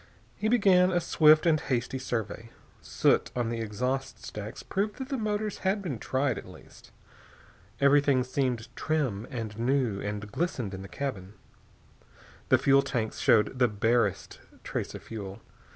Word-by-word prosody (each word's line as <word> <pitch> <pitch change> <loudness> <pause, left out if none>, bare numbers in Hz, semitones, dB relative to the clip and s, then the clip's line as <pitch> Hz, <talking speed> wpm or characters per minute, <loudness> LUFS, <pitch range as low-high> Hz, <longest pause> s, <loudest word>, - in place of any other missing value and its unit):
He 215 - -2
began 190 -6 +5
a 175 -1 +2
swift 155 -1 +5
and 160 -2 +4
hasty 130 0 -2
survey. 115 -2 -4 0.3
Soot - - +2
on 120 -2 0
the 115 0 -3
exhaust 125 +5 -3
stacks 105 0 -7
proved 205 +2 -2
that 265 0 -7
the 275 - -1
motors 210 -2 -2
had 195 +2 0
been 140 - -4
tried, 130 -1 0
at - - -12
least. - - -15 0.9
Everything 140 -2 +4
seemed 125 -2 -2
trim 130 -9 -1
and 115 -4 -5
new 120 -4 +1
and 105 0 -5
glistening 125 - -2
in 95 - -6
the 95 - -8
cabin. 105 -8 -5 1.1
The - - +6
fuel 140 0 +4
tanks 115 -5 -3
showed 115 +3 +3
the 125 - +5
barest 110 -1 0 0.2
trace - - -4
of - - -9
fuel. 100 -2 -7
130 Hz, 150 wpm, -28 LUFS, 110-155 Hz, 1.1 s, The